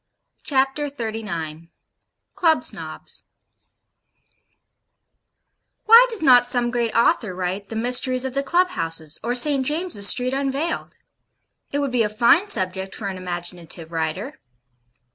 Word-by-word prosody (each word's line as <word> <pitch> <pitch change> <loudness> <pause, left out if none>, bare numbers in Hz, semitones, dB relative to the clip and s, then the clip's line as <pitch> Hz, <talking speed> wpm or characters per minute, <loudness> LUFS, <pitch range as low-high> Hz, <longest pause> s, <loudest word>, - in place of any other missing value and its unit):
CHAPTER 270 +1 0
XXXIX 210 - -6 0.6
CLUB 325 -3 +2
SNOBS - - -7 2.6
Why 465 +3 +8
does 450 -7 -2
not 250 -3 +6
some 245 -1 +2
great 235 -2 -1
author 225 -4 +2
write 185 +2 -4
'The 225 - -7
Mysteries 250 +2 0
of 260 - -4
the 275 - 0
Club 350 +6 +1
houses; 165 - -5
or 240 +2 -1
St. 275 +1 +4
James's 300 - 0
Street 250 +3 +1
unveiled?' 275 +4 -2 0.8
It 285 - -2
would 280 -2 -1
be 245 -1 +1
a 210 - +1
fine 240 - +3
subject 190 - +1
for 200 - -4
an 190 - -6
imaginative 175 -2 -5
writer. 165 - -4
240 Hz, 125 wpm, -22 LUFS, 185-275 Hz, 2.6 s, Why